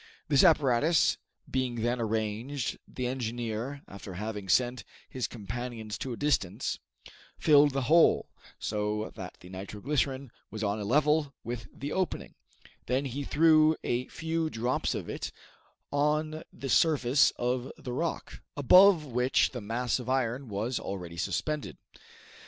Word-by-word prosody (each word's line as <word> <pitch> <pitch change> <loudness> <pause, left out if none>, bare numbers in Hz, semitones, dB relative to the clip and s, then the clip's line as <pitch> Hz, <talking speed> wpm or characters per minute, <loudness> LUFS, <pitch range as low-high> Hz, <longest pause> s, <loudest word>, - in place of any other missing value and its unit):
This 140 -3 +5
apparatus 155 -1 +4 0.3
being 130 -2 -1
then 120 +1 0
arranged, 110 +5 -2
the 125 - -5
engineer, 120 +1 -3
after 95 -1 -9
having 105 0 -5
sent 125 +1 +2 0.2
his 130 -2 -3
companions 115 0 -6
to 130 - -4
a 120 - -4
distance, 125 -7 0 0.6
filled 145 -2 +5
the 135 -1 0
hole, 165 +5 +5 0.3
so 105 0 -2
that 95 -4 -8
the 90 - -12
nitro 95 +2 -7
glycerine 135 0 -1 0.2
was 110 0 -5
on 105 +1 0
a - - -3
level 150 +3 +2
with 115 -4 -5
the 140 +2 -6
opening; 185 -1 -2 0.5
then 130 +3 +1
he 135 +2 -3
threw 155 +1 +5
a 120 +1 -1
few 160 0 -2
drops 120 0 -1
of - - -5
it - - -4 0.6
on 150 +2 0
the 135 - -7
surface 140 -4 +4
of 125 +1 -1
the 125 - -6
rock, 165 +6 -3 0.2
above 180 +4 +7
which 125 0 +2
the 125 - -6
mass 115 +4 -1
of 125 0 -6
iron 130 0 0
was 110 +5 -2
already 90 -3 -6
suspended. 150 - -2
125 Hz, 140 wpm, -29 LUFS, 110-145 Hz, 0.6 s, above